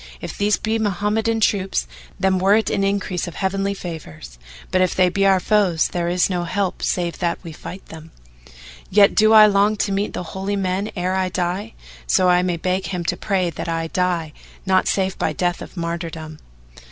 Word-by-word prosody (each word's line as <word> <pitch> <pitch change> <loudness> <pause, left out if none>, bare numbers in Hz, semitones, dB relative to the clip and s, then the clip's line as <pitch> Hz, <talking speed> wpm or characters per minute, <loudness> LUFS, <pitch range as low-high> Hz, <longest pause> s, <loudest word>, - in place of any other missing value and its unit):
If - - -7
these 205 +1 +1
be 225 0 -1
Mohammedan 215 +2 0
troops, 195 - +1 0.3
then 190 -1 +2
were 195 +3 +4
it 220 - +1
an 195 - 0
increase 195 -3 -1
of 170 - -8
heavenly 195 +1 -1
favours; 80 - -9 0.3
but, 185 - +2
if 185 - +1
they 185 -1 +4
be 195 +2 +1
our 190 -1 +4
foes, 190 -5 +2
there 175 -1 -2
is 175 +1 +2
no 180 -2 -2
help 190 +2 -2
save 175 -3 -1
that 170 -2 0
we 165 - -7
fight 180 +4 -9
them. 160 0 -11 0.8
Yet 200 +1 +5
do 215 +1 +4
I 215 -1 +9
long 205 +1 +3
to 200 - -1
meet 200 +1 -1
the - - -4
Holy 195 +1 -2
Man 195 +1 -1
ere 180 0 -1
I 190 -1 0
die, 185 +5 -3 0.3
so 185 -2 +3
I 180 0 +4
may 180 -1 -1
beg 185 +2 -1
him 175 -2 -4
to - - 0
pray 185 -4 -1
that 165 - -6
I 165 0 -2
die 175 -4 -1 0.3
not 190 -1 +2
save 190 -1 0
by 155 - 0
death 175 +2 -1
of - - -10
martyrdom." 165 -2 -5
185 Hz, 200 wpm, -21 LUFS, 175-200 Hz, 0.8 s, I